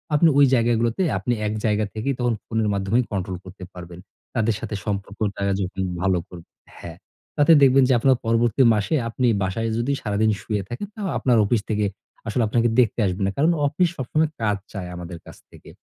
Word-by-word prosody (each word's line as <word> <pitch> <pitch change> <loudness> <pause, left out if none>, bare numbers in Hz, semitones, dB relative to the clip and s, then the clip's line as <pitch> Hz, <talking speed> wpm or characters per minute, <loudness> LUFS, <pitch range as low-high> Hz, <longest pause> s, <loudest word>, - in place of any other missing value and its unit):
আপনি 165 +3 +5
ওই 145 - +7
জায়গাগুলোতে 115 +2 +1 0.2
আপনি 120 - -1
এক 105 - -2
জায়গা 105 -1 +1
থেকেই 115 +6 -2
তখন 120 -1 +1
ফোনের 110 -1 -1
মাধ্যমে 100 +3 0
কন্ট্রোল 95 -2 -3
করতে 95 0 -11
পারবেন। 90 -1 -10 0.4
তাদের 115 -2 +1
সাথে 110 -1 -5
সম্পর্কটা 100 +1 -2
তারা 100 0 0
যখন 95 0 -4 0.2
ভালো 95 -1 +2
করব 85 -2 -11 0.3
হ্যাঁ, 85 -1 -9 0.4
তাতে 145 +2 +5
দেখবেন 135 0 +6
যে - - +5
আপনার 130 +2 +4
পরবর্তী 115 +1 +2
মাসে 105 +9 0
আপনি 125 +2 0 0.2
বাসায় 115 +5 -2
যদি 120 +4 -1
সারাদিন 110 +1 +1
শুয়ে 105 -3 -2
থাকেন, 120 +12 -5
তাও 210 -3 -4
আপনার 125 -3 +2
অফিস 110 +1 +1
থেকে 105 -1 0 0.4
আসলে 115 +2 0
আপনাকে 115 +2 +2
দেখতে 120 -1 +2
আসবে 95 0 -2
না, 100 - 0
কারণ 155 +5 +3 0.2
অফিস 170 +5 +1
সবসময় 150 +5 0
কাজ 105 -2 +1 0.2
চায় 95 -4 -5
আমাদের 85 0 -7
কাছ - - -13
থেকে। - - -15
110 Hz, 190 wpm, -23 LUFS, 100-120 Hz, 0.4 s, ওই